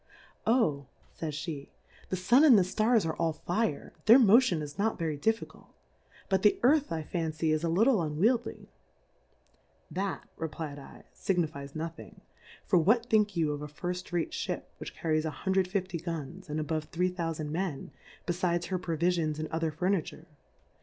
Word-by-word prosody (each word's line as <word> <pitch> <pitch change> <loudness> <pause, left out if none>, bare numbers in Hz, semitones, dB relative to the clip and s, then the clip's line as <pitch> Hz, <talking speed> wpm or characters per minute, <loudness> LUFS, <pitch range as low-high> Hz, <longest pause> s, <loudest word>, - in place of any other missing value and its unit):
Oh, 155 - +2 0.3
fays 155 -3 -4
pe^ 150 -2 -5 0.4
the - - -1
Sun 235 - +4
and 270 -8 +8
the 190 - +5
Stars 215 +2 +2
are 160 -1 -2
all 165 -1 +1
Fire, 175 0 -2
their 230 +4 +9
Motion 225 - +5
is 145 +5 -9
not 220 +2 +1
verv 155 -4 -3
difficult; 225 0 -2 0.6
but 190 -1 +1
the 210 - +4
Earth 290 +3 +4
I 160 -1 -2
fan 160 0 -3
cy, 155 0 0
is 155 +1 0
a 170 - +1
little 220 +9 +4
unweildy. 190 +11 0 1.3
That, 195 +1 -3
re^lfd 150 -3 -6
7, 175 -4 0
figniiies 140 -1 -10
nothing; 165 +1 -7 0.4
for 180 - +4
what 230 +8 +2
think 210 -3 +3
you 155 -3 +2
of 145 0 -4
^ 150 -1 -7
Firft 180 +4 -5
Rate 175 -2 -1
Ship, - - -3
which - - -8
car 165 - -2
ries 155 0 +2
1 190 +4 0
50 185 -2 -2
Guns, 170 +1 -6
and 150 +1 -2
above 155 0 -2
3000 165 -4 -2
Men, 170 -4 -3 0.3
befides 175 -1 -1
her 185 -1 -1
Provifions 165 -2 0
and 155 0 -3
other 160 0 -1
Furni 180 +2 0
ture 160 - -11
170 Hz, 165 wpm, -30 LUFS, 155-195 Hz, 1.3 s, their